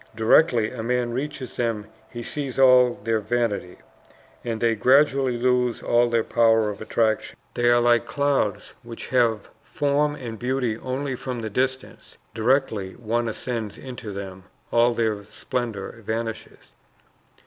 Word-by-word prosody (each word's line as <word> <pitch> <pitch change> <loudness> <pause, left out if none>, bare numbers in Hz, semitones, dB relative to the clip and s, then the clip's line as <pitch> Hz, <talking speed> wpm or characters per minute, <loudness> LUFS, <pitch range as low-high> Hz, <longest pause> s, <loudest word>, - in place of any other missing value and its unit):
Directly 115 0 +4
a 125 - -6
man 120 0 -1
reaches 135 -1 -5
them 115 -3 -1 0.2
he 120 0 -7
sees 140 0 -5
all 125 -2 +6
their 115 0 +1
vanity, 105 -4 -2 0.7
and 115 -2 -3
they 115 0 +2
gradually 130 +2 +3
lose 125 -1 +1
all 120 0 +3
their 115 -1 +1
power 115 -2 +3
of 100 - -10
attraction. 110 -2 0 0.2
They 120 0 +2
are 120 0 +5
like 120 0 +3
clouds 140 -8 0
which 115 -1 -9
have 115 -4 +1
form 145 0 0
and 115 -6 -7
beauty 125 -2 -1
only 130 +3 -3
from 125 -1 -5
the 110 -1 -5
distance; 130 +3 -3 0.2
directly 110 -4 0
one 120 +1 -2
ascends 110 -2 -4
into 125 -5 -8
them, 95 -1 -8 0.3
all 120 0 +3
their 110 -3 -1
splendor 115 -1 -5
vanishes. 115 +1 -5
120 Hz, 140 wpm, -24 LUFS, 110-130 Hz, 0.7 s, all